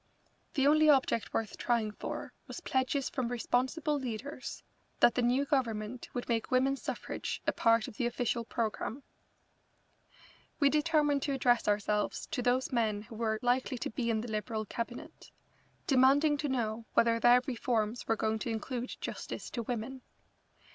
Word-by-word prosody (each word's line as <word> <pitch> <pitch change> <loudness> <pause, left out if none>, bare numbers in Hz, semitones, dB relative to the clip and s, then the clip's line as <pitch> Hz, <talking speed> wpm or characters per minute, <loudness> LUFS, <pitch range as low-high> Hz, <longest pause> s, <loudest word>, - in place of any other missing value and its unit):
The 275 -2 +3
only 310 +1 +6
object 265 -5 +3
worth 220 -2 -3
trying 230 -3 +1
for - - -6
was - - -6
pledges 260 +1 0
from 255 -3 -2
responsible 260 +6 0
leaders 255 +2 -6 0.4
that 240 - +6
the 250 - +1
new 250 +4 +2
Government 235 -4 -1
would 245 - -3
make 230 -2 0
women's 265 +2 +2
suffrage - - -4
a - - +3
part 230 -1 +3
of 210 - -10
the 240 - +1
official 240 0 -1
programme. 230 +3 -3 1.6
We 280 -2 +5
determined 300 -2 +2
to 280 - -1
address 245 -3 +2
ourselves 210 0 0
to - - -1
those 250 +1 +1
men 215 -4 0
who 225 - -11
were 220 -1 0
likely 250 +1 +1
to - - -4
be 235 +1 -2
in 220 -1 +1
the 240 - -6
Liberal 215 0 -2
Cabinet, 235 +3 -6 0.6
demanding 280 +3 +5
to 290 0 -2
know 230 -3 -2
whether 230 0 +4
their 245 +1 +6
reforms 235 -2 -1
were 225 - +3
going 220 0 0
to 235 - -3
include 240 +3 -4
justice - - -5
to 235 - -3
women. 245 +3 -4
245 Hz, 160 wpm, -32 LUFS, 225-265 Hz, 1.6 s, only